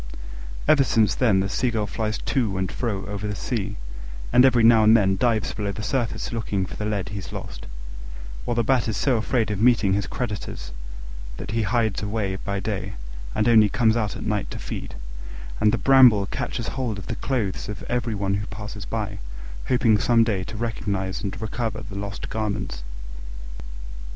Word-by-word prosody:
Ever 145 -3 +6
since 110 -3 +3
then 110 -7 +3
the 95 - 0
Seagull 110 +1 0
flies 110 +1 -2
to 115 -8 -1
and 95 -1 -1
fro 105 -6 -2
over 105 +1 -4
the 105 - -3
sea, 105 0 -3 0.6
and 125 - +7
every 125 -3 +4
now 115 -1 +7
and 110 +1 +7
then 95 -3 +3
dives 110 0 +1
below 100 -2 -2
the 105 - -6
surface, 120 0 -2
looking 105 -4 -1
for - - -8
the 105 - -4
lead 100 -3 -2
he's 100 -1 -6
lost; - - -7 0.8
while 120 - -1
the 120 - +2
Bat 125 0 +2
is 110 - -1
so 130 -4 +2
afraid 110 0 0
of 105 -1 -2
meeting 110 -5 +4
his 100 0 0
creditors 105 - -5 0.7
that - - -6
he 115 +1 0
hides 110 0 +1
away 100 -2 -2
by 100 +1 -3
day 95 -2 -3 0.4
and 110 - +2
only 110 -3 +6
comes 115 -1 +3
out 105 -4 -1
at - - -6
night 105 -2 -1
to - - -6
feed; - - -6 0.6
and 105 - +4
the 120 - +1
Bramble 120 -3 +6
catches 115 +3 -3
hold 125 -6 -3
of 95 - -7
the - - -3
clothes 110 -10 -2
of 105 - -6
every 120 -2 -1
one 100 -1 -1
who 100 +2 -2
passes 105 0 -7
by, 105 -4 -3 0.5
hoping 115 -4 +3
some 115 +1 +4
day 105 -5 0
to 110 - -7
recognise 100 -4 -2
and 95 -1 -4
recover 110 +1 -3
the 110 -3 -9
lost 100 0 -5
garments. 105 - -3
105 Hz, 185 wpm, -24 LUFS, 100-115 Hz, 0.8 s, and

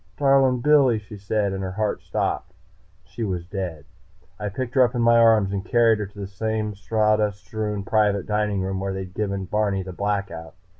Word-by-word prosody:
"Darlin' 135 -3 +3
Billy!" 140 -4 +4
she 105 0 -10
said, 100 0 -1
and 95 - -4
her 95 -1 -4
heart 105 +1 -1
stopped. - - -3 0.5
She 100 +5 -7
was 90 -5 -3
dead. 90 -6 -5 0.5
I 105 -1 -2
picked 120 +4 -4
her 130 - +4
up 125 +1 0
in 120 - 0
my 115 0 +5
arms 110 -4 +4
and 95 -1 -2
carried 115 -2 +3
her 105 - -3
to 100 +1 -14
the - - -3
same 105 +2 -3
sawdust 105 -1 0
strewn 105 +1 -3
private 105 -2 +1
dining 105 -2 0
room 95 0 -2
where 95 0 -3
I'd 95 -1 -7
given 100 -2 -2
Barney 100 -1 0
the 95 0 -8
Blackout. 100 -4 -3
105 Hz, 195 wpm, -23 LUFS, 95-110 Hz, 0.5 s, my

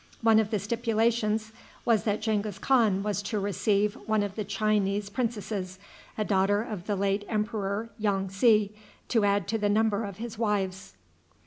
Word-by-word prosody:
One 225 -1 +6
of 215 -2 +1
the 215 - 0
stipulations 220 0 0 0.3
was 230 -3 +2
that 210 -1 0
Genghis 210 -3 -1
Khan 215 -6 +2
was 205 -1 -1
to 205 +1 -2
receive 205 +1 +1
one 215 -1 +2
of 200 -1 -4
the 215 - -3
Chinese 205 -1 0
princesses, 210 -5 -3 0.4
a 215 - 0
daughter 205 +1 +2
of 205 -6 -7
the 205 - 0
late 200 +1 0
emperor 210 0 -2
Yong 195 -2 0
tsi, 210 +1 +3 0.4
to 225 -3 +2
add 200 -2 +1
to 225 +1 0
the 205 -1 +1
number 220 +1 +2
of 200 -3 -6
his 230 -1 -7
wives. 195 - -1
210 Hz, 165 wpm, -28 LUFS, 200-220 Hz, 0.4 s, One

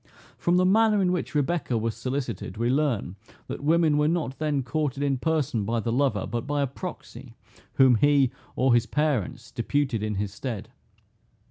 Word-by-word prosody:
From 175 +1 +1
the 185 - +3
manner 215 +2 +4
in 185 -2 +2
which 175 -3 -3
Rebecca 150 -4 0
was 115 0 -2
solicited, 125 -4 -4
we 120 +2 +1
learn, 130 -9 0 0.3
that - - -6
women 155 -1 +3
were 150 - +3
not 155 -5 -1
then 150 -3 0
courted 140 +1 -2
in 135 -2 0
person 150 -7 0
by 115 +3 -1
the 115 +1 -2
lover, 120 -5 +1
but 120 +3 -4
by 145 0 0
a - - +2
proxy, 135 - -8 0.4
whom 130 -2 +6
he, 140 -1 +4 0.2
or 130 -1 +3
his 120 -1 +3
parents, 150 -10 -1
deputed 130 -1 -1
in 105 -1 -2
his 100 0 -3
stead. 115 -2 -5
135 Hz, 175 wpm, -26 LUFS, 115-155 Hz, 0.4 s, whom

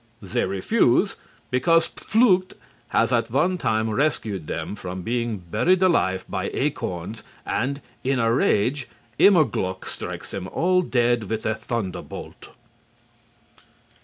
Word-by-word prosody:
They 95 -3 -1
refuse, 95 0 +2 0.4
because 165 +7 +3
Pflucht 195 -5 +2 0.4
has - - +2
at - - +1
one 180 0 +1
time 110 -4 +1
rescued 110 - -1
them - - -4
from 95 -2 -6
being 120 0 -1
buried 170 - +1
alive 95 - +2
by - - -3
acorns, 90 +5 -3 0.2
and, 140 +3 -1 0.2
in 135 +1 +1
a 115 -1 +2
rage, 125 +3 +1 0.3
Immerglück 115 - +3
strikes - - -7
them 95 -1 -5
all 180 - +2
dead 120 -7 +1
with 110 -1 -3
a 110 - +1
thunderbolt. 110 -3 -6
115 Hz, 120 wpm, -24 LUFS, 100-155 Hz, 0.4 s, because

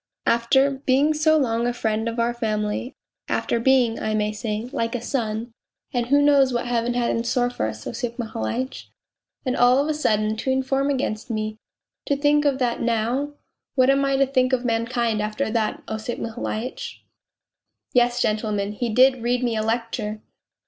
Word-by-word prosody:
' - - -58
After 265 +4 +3 0.2
being 275 +4 +4
so 315 +1 +3
long 235 -4 +1
a 245 - 0
friend 220 -1 -1
of 230 +1 -4
our 235 +1 +1
family, 215 +1 -2 0.3
after 235 - 0
being, 245 -2 +3
I 215 0 -1
may 210 0 0
say, 215 +1 -4
like 230 +1 -1
a - - -1
son 230 -2 -2 0.4
and 240 -2 0
who 285 +2 +4
knows 280 -2 +5
what 240 0 -1
Heaven 240 0 0
had 240 -1 +1
in 230 - -1
store 245 +1 +1
for 110 - -2
us, 110 0 -7
Osip 235 0 -4
Mihailitch? 230 - -4 0.6
and 255 - 0
all 245 +1 +5
of 285 +2 +2
a 310 - +1
sudden 215 -7 +1
to 265 - -3
inform 265 +1 +1
against 255 -6 -2
me 215 -1 -3 0.5
to 285 - +1
think 295 +1 +3
of 280 -2 +2
that 245 -3 -1
now!... 240 +5 0 0.4
What 260 0 +5
am 275 0 +2
I 275 -1 +2
to 275 - +4
think 260 -1 +1
of 250 -1 +1
mankind 230 -1 0
after 215 +3 -2
that, 220 -2 -1
Osip 220 +2 -4
Mihailitch? 245 - -5 0.4
' - - -46
Yes, 245 0 +3
gentlemen, 210 -2 0
he 235 +3 -3
did 255 +2 +4
read 245 +2 0
me 235 -2 0
a 215 - 0
lecture 225 -1 -2
240 Hz, 185 wpm, -23 LUFS, 220-265 Hz, 0.6 s, knows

